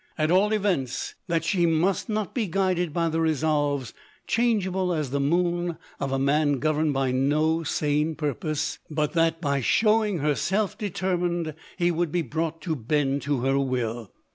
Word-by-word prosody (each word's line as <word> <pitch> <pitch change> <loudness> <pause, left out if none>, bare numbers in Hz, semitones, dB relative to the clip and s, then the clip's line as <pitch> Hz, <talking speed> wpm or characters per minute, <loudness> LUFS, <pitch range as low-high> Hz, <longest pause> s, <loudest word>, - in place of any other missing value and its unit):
At 155 0 +1
all 195 +4 +4
events, 190 - -1
that 165 -2 0
she 170 0 +2
must 170 +7 +1
not 215 -2 -2
be 230 -5 -1
guided 180 -2 0
by 170 +2 0
the 165 0 0
resolves, 145 -4 0 0.3
changeable 190 -6 +1
as 150 -5 -2
the 140 - 0
moon, 175 +3 0 0.2
of 135 - -2
a 135 - +1
man 145 +2 +2
governed 155 +2 +1
by 135 -2 0
no 150 +5 +2
sane 150 0 0
purpose; 150 +1 -2
but 150 -1 -1
that, 165 -1 +2
by 140 -4 0
showing 215 - +3
herself 175 +7 0
determined, 175 -4 -1 0.3
lie 175 0 +3
would 170 -1 -1
be 175 0 0
brought 165 0 -3
to 160 -2 -1
bend 140 +2 0
to 140 -3 -1
her 135 +2 +2
will. 120 -5 -2
160 Hz, 165 wpm, -25 LUFS, 145-175 Hz, 0.3 s, all